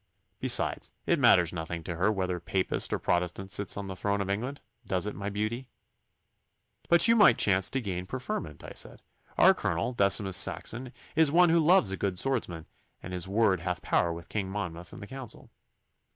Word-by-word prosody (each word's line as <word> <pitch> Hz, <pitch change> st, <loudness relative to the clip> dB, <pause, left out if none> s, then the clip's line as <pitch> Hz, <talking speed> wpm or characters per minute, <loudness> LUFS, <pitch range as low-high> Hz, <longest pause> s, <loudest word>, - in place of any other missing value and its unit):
Besides, -, -, 0 dB
it -, -, +1 dB
matters 85 Hz, 0 st, +4 dB
nothing 85 Hz, 0 st, -5 dB
to 85 Hz, +1 st, -5 dB
her 95 Hz, +6 st, +1 dB
whether 95 Hz, -3 st, -2 dB
Papist 90 Hz, +2 st, -2 dB
or -, -, 0 dB
Protestant 90 Hz, +2 st, -2 dB
sits 100 Hz, -2 st, +1 dB
on 100 Hz, -, -4 dB
the 95 Hz, -1 st, -6 dB
throne 100 Hz, +2 st, -1 dB
of 100 Hz, 0 st, -2 dB
England 125 Hz, +8 st, -4 dB, 0.3 s
does 95 Hz, 0 st, 0 dB
it, 105 Hz, -, -4 dB
my 100 Hz, +1 st, -5 dB
beauty?' 110 Hz, +5 st, -3 dB, 1.2 s
'But 170 Hz, +5 st, +5 dB
you 230 Hz, -, +5 dB
might 210 Hz, -3 st, +6 dB
chance 95 Hz, -2 st, +3 dB
to 135 Hz, -, -1 dB
gain 90 Hz, -4 st, -5 dB
preferment,' 100 Hz, -, -5 dB
I -, -, -9 dB
said. -, -, -9 dB, 0.3 s
'Our -, -, +7 dB
Colonel, 85 Hz, +9 st, -2 dB
Decimus 100 Hz, -3 st, +3 dB
Saxon, 125 Hz, +2 st, 0 dB, 0.2 s
is 160 Hz, -2 st, +4 dB
one 175 Hz, +2 st, +5 dB
who 170 Hz, -, +4 dB
loves 160 Hz, -, +4 dB
a 95 Hz, -, -3 dB
good 95 Hz, -2 st, -2 dB
swordsman, 90 Hz, -10 st, -1 dB, 0.4 s
and 90 Hz, -, -7 dB
his 90 Hz, 0 st, -3 dB
word 100 Hz, -2 st, +2 dB
hath 90 Hz, +1 st, -4 dB
power 85 Hz, -, +1 dB
with 85 Hz, +1 st, -8 dB
King 100 Hz, -3 st, -3 dB
Monmouth 90 Hz, -4 st, -6 dB
and -, -, -10 dB
the -, -, -7 dB
council. 130 Hz, +2 st, -10 dB
100 Hz, 190 wpm, -28 LUFS, 90-120 Hz, 1.2 s, Our